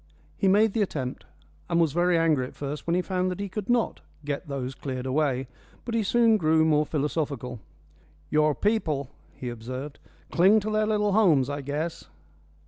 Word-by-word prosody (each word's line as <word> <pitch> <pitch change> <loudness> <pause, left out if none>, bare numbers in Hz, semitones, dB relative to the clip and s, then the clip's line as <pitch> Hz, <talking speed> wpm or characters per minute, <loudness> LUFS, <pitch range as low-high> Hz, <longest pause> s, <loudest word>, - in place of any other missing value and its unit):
He 195 - +1
made 205 +2 +4
the 225 - +1
attempt, 130 - -3 0.4
and 170 - +2
was 160 -4 +2
very 175 +1 +3
angry 155 -6 +2
at - - -14
first 145 +2 -5
when 170 - +2
he 180 - +1
found 185 -1 -1
that 180 +1 -4
he 200 - -2
could 200 +2 -6
not 240 -1 +1 0.2
"get 145 +3 -3
those 135 -2 -4
cleared 130 -1 -5
away." 135 -1 0 0.4
But 235 - -4
he 230 - +2
soon 225 +1 +4
grew 160 -3 +3
more 150 -1 +3
philosophical. 140 -5 -2 0.7
"Your 150 -1 +3
people," 155 - 0 0.2
he 125 - -6
observed, 130 +5 -7 0.3
"cling 195 +5 +5
to 215 +2 -3
their 215 0 +1
little 210 -1 +1
homes, 160 - +4
I 145 0 -3
guess." 150 +4 -4
160 Hz, 180 wpm, -26 LUFS, 140-195 Hz, 0.7 s, cling